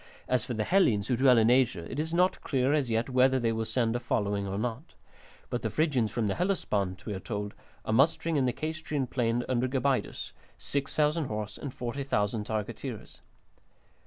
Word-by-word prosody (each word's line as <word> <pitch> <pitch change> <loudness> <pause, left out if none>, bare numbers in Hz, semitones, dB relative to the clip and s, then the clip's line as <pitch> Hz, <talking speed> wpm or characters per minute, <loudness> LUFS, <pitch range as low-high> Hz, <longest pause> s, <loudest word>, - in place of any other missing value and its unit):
As 125 -3 +2
for 125 -2 -4
the 110 - 0
Hellenes 115 - +3
who 125 - +3
dwell 130 0 +5
in 115 +1 +5
Asia, 125 -9 +2
it 130 - -5
is 160 +1 -2
not 180 +2 +2
clear 135 0 +1
as 145 -5 +1
yet 115 +1 +1
whether 130 0 +3
they 115 -2 +1
will 110 0 -1
send 115 -1 0
a - - 0
following 100 -4 -1
or 95 0 -3
not. 120 +7 -4 0.6
But - - -1
the - - -1
Phrygians 140 -8 +1
from 115 +2 -1
the 100 - +1
Hellespont, 105 - -1
we 105 - -3
are 95 - -4
told, 105 0 -4 0.3
are 110 - 0
mustering 160 +6 +3
in 135 -3 +2
the 125 - +2
Caystrian 155 -1 -3
plain 120 -1 0
under 130 0 +1
Gabaidus, 135 0 -1 0.3
6000 150 +3 0
horse 105 -3 -4
and 140 - -6
40,000 120 -5 -2
targeteers. 110 -2 -5
125 Hz, 190 wpm, -29 LUFS, 110-140 Hz, 0.6 s, dwell